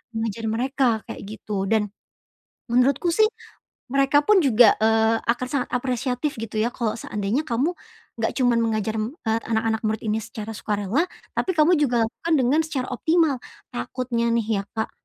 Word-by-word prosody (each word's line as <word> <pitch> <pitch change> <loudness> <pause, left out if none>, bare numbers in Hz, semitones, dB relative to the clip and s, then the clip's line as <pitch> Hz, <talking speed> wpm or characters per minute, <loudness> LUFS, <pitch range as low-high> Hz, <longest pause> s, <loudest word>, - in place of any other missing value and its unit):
mengajar 225 0 -3
mereka, 260 +3 +1 0.2
kayak - - -8 0.2
gitu. 200 -1 -3
Dan, 215 -1 +2 0.8
menurutku 275 +7 +3
sih, 435 +4 +5 0.6
mereka 275 +2 +3
pun 420 -3 +5
juga, 240 -6 +6
eee, 225 0 +3
akan 240 +2 0
sangat 265 -2 -1
apresiatif, 250 +3 -1
gitu 220 -1 -5
ya, 225 +2 +2
kalau 225 -4 -1
seandainya 210 +7 -2
kamu, 270 +6 0 0.4
enggak - - -1
cuman 245 -3 +3
mengajar, 220 -1 -1
eee, 225 0 -2
anak-anak 220 0 0
murid 215 0 -1
ini 215 0 +1
secara 220 0 -7
sukarela, 210 - 0 0.3
tapi 370 - +1
kamu 325 +2 +4
juga 250 -6 +2
lakukan 325 +8 -3
dengan 265 +5 +3
secara 265 -5 -3
optimal. 320 +2 +2 0.3
Takutnya 235 - -2
nih, 225 -2 +1
ya, - - -11
Kak, 220 -1 -2
235 Hz, 155 wpm, -23 LUFS, 220-275 Hz, 0.8 s, juga